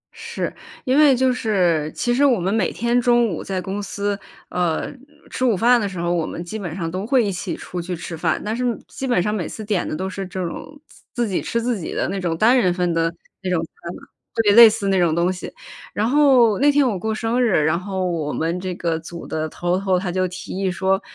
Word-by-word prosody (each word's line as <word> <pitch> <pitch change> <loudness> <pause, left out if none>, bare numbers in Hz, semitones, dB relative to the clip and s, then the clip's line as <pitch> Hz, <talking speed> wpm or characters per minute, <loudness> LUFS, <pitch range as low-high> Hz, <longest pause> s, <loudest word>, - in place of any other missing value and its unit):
是， 465 +1 -4 0.3
因 260 +1 +2
为 290 -4 +6
就 260 0 +2
是 175 -10 +1
其 240 - 0
实 275 +4 +2
我 250 -8 +4
们 190 +4 0
每 215 -6 +1
天 240 +1 +1
中 240 -1 +4
午 170 - -4
在 190 -1 -3
公 195 +3 -4
司， 200 0 -2 0.3
呃， 175 - -1 0.4
吃 255 - -3
午 230 -7 +3
饭 240 +3 +4
的 200 - -1
时 180 -3 -7
候， 170 0 0
我 165 -2 0
们 170 - -6
基 215 +5 -6
本 175 -5 -5
上 170 -4 -3
都 185 +4 -4
会 250 -2 +3
一 200 - -1
起 180 - -4
出 180 -1 -6
去 180 +1 -4
吃 170 0 -6
饭， 160 - 0
但 215 +2 -1
是 250 - -2 0.2
基 265 - -5
本 240 -8 +2
上 210 - -1
每 185 -7 -2
次 215 - -7
点 200 -4 0
的 - - -3
都 190 +4 -3
是 195 0 -5
这 185 0 -5
种 290 - -8
自 - - -20 0.2
自 - - -3
己 190 - -1
吃 235 - -1
自 235 -3 -1
己 160 - -5
的 - - 0
那 195 - -2
种 165 -2 -1
单 230 +6 +5
人 225 -8 +3
份 175 -1 0
的 165 0 +1 0.3
那 185 - -3
种 180 -2 +1
餐 170 +2 -10
嘛， - - -12 0.3
特 225 - +3
别 205 - +5
类 230 0 +10
似 215 -2 -2
那 190 -1 +3
种 170 -2 +2
东 175 +2 +2
西。 185 - -7 0.4
然 215 +2 0
后 255 -6 +5
那 290 +1 +5
天 285 -2 +3
我 205 -5 -1
过 220 +4 -2
生 230 +3 0
日， 190 -11 +3
然 165 +2 +2
后 190 -1 -3
我 160 -4 -2
们 165 +3 -1
这 185 -1 -4
个 165 -2 -1
组 170 +1 -9
的 155 0 -3
头 175 +3 -1
头， 190 -2 +1
他 180 -1 -2
就 185 +1 0
提 180 +1 -7
议 190 0 0
说，： 190 +2 0
190 Hz, 275 characters per minute, -21 LUFS, 175-230 Hz, 0.4 s, 类